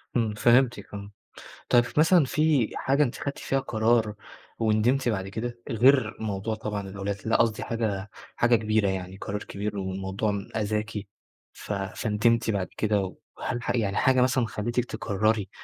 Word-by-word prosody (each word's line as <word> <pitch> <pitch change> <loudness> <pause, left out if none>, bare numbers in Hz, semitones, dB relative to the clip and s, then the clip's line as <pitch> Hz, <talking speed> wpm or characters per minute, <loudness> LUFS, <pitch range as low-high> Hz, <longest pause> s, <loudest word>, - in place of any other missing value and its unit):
إمم، 115 -3 +1
فهمتِك 120 -1 +2
آه. 100 0 -7 0.6
طَب 120 - +6
ف 125 +4 -3
مثلًا 165 +1 +6
في 150 -3 +2
حاجة 140 +2 +2
أنتِ 125 -5 0
خدّتِ 140 -1 -4
فيها 135 - 0
قرار 115 -4 +1 0.4
وندمتِ 115 +4 +2
بعد 95 -4 -1
كده؟ 120 +4 -5
غير 120 0 +4
موضوع 110 0 -2
طبعًا 105 -2 -4
الأولاد، 100 +1 -3
لأ، 115 - +3
قصدي 115 -2 +1
حاجة 105 -4 -2 0.3
حاجة 120 0 +4
كبيرة 110 -2 +1
يعني، 95 -1 -4
قرار 105 +1 -5
كبير 100 +1 -4
والموضوع 95 +2 -2
أذاكِ، 105 0 -1 0.6
ف - - -7
فندمتِ 110 +3 0
بعد 100 -3 -1
كده 105 -1 +1
و 95 -2 -6 0.3
هل 120 - -2
ح - - -2
يعني 105 -5 0
حاجة 130 -1 +4
مثلًا 125 -1 +2
خلّتِك 120 +3 -2
تقرري 110 -2 0
110 Hz, 155 wpm, -26 LUFS, 100-120 Hz, 0.6 s, طَب